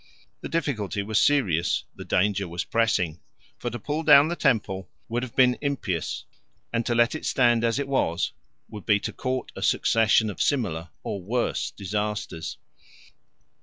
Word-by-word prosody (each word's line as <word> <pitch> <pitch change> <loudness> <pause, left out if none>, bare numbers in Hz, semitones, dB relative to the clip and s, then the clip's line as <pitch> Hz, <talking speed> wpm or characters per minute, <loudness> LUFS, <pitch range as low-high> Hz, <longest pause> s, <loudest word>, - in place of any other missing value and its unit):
The - - -7
difficulty 110 - -1
was 110 +1 +1
serious, 95 - +2
the - - -8
danger 100 0 +1
was 85 +1 -3
pressing; 100 -8 0 0.4
for 120 - -2
to 120 - -5
pull 150 +7 -3
down 150 -1 +7
the 175 - -1
temple 105 - 0 0.2
would 120 +2 -1
have 125 -2 -7
been 125 -1 +4
impious, 120 - -2 0.5
and 115 - +1
to 120 - +1
let 120 +1 +4
it 155 - -5
stand 120 -3 +3
as 115 +1 +1
it 140 -1 -2
was 95 -10 0 0.3
would 105 -3 -10
be 105 -1 +4
to - - -5
court 130 -1 -3
a - - -7
succession 110 -1 +3
of - - -6
similar 95 - 0
or 100 - -4
worse 115 +6 -1
disasters. 105 -3 -4
115 Hz, 165 wpm, -25 LUFS, 100-130 Hz, 0.5 s, down